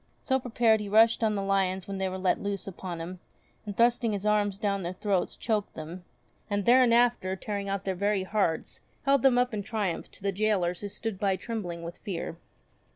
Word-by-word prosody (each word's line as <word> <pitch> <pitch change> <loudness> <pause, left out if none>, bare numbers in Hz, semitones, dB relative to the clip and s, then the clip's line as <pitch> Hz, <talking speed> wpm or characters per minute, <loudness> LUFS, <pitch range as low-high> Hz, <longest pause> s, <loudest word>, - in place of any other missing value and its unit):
So 265 -1 +2
prepared 230 -3 +3
he 210 -1 -5
rushed 225 +2 +5
on 215 -1 +2
the 200 - -1
lions 190 -1 0
when 195 -1 -4
they 190 0 0
were 185 - -4
let 185 -1 +1
loose 200 -2 -3
upon 180 -2 -6
him, 175 +2 -6 0.5
and 205 - -5
thrusting 235 -1 +3
his 200 0 -3
arms 205 -2 +2
down 200 -1 -1
their 175 0 -3
throats 195 -2 -1
choked 215 -3 -1
them, 165 +3 -8 0.4
and 205 -1 -1
thereinafter 240 -5 +4
tearing 200 0 -4
out 195 -1 -2
their 190 - -1
very 200 +1 0
hearts, 190 -5 -1 0.2
held 275 -1 +3
them 260 -1 +5
up 245 -1 +2
in 210 - -1
triumph 205 -5 -2
to - - -16
the 200 - +1
gaolers 190 -3 0
who 205 - -4
stood 210 -1 -4
by 195 -2 +2
trembling 185 -4 -5
with 170 +1 -7
fear. 180 -5 -4
200 Hz, 205 wpm, -28 LUFS, 185-220 Hz, 0.5 s, rushed